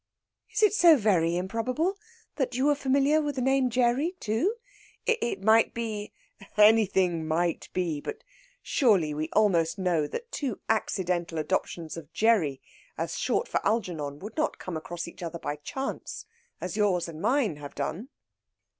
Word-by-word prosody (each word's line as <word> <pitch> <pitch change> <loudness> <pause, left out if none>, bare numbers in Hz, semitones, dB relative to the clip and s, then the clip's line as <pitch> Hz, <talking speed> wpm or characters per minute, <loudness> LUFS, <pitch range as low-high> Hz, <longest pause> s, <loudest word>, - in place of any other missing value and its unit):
"Is - - 0
it 420 - +5
so 340 -6 +7
very 175 -7 +2
improbable 245 - -1 0.4
that 260 -4 -1
you 260 +2 +1
were 295 - +5
familiar 280 +2 +2
with 290 -2 -2
the 260 - -2
name 265 -1 +3
Gerry 250 +7 +1
too? 230 - 0 0.5
It 345 - 0
might 220 +2 +4
be 220 -3 -4 0.2
" - - -55 0.2
"Anything 190 -6 +4
might 170 +2 0
be. 170 -5 -1
But 440 - -6 0.4
surely 195 - +3
we 155 +2 -3
almost 180 -5 +3
know 175 -6 +1
that 475 - -6
two 265 -8 -3
accidental 180 -6 -1
adoptions 165 0 -2
of 155 -4 -10
Gerry 195 -12 +2 0.3
as - - -3
a - - -4
short - - 0
for - - -1
Algernon 170 -10 -1
would 205 +8 -9
not 310 0 0
come 180 - -6
across 170 +2 -5
each 170 - -11
other 170 -1 -4
by 145 -2 -4
chance, 265 - -5 0.3
as 180 0 -4
yours 200 -5 +1
and 160 -1 -8
mine 225 - +1
have 145 -1 -9
done." 180 - -4
205 Hz, 165 wpm, -28 LUFS, 170-255 Hz, 0.5 s, so